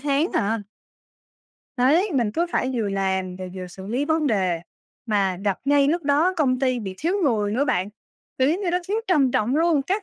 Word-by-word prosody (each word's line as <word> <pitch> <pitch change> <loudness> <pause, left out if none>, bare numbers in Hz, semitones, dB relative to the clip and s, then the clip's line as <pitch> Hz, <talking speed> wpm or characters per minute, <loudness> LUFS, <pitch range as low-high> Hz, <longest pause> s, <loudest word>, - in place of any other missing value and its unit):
tháng 290 +4 +1
à. 210 +1 0 1.1
Đấy, 315 +11 +3
mình 235 -5 +1
cứ 340 +2 0
phải 260 - 0
vừa 220 -4 -1
làm 190 -2 -1
rồi 185 -1 -7
vừa 185 -1 -6
xử 190 +2 -10
lý 250 +7 -1
vấn 315 -1 +1
đề, 185 -7 +1 0.5
mà 195 -4 +1
gặp 200 -2 0
ngay 280 0 +3
lúc 335 +2 0
đó 295 +6 +2
công 255 -5 +2
ty 255 -2 +1
bị 190 -4 -6
thiếu 340 +5 0
người 210 -6 +1
nữa 265 +6 +1
bạn, 185 -7 0 0.5
kiểu, 260 +1 +3
giống 360 +5 -1
như 365 - -1
nó 360 - +1
thiếu 415 - 0
trầm 290 -8 +3
trọng 240 +4 +1
luôn, 320 -3 +3
các 395 +7 -1
255 Hz, 210 wpm, -23 LUFS, 200-310 Hz, 1.1 s, Đấy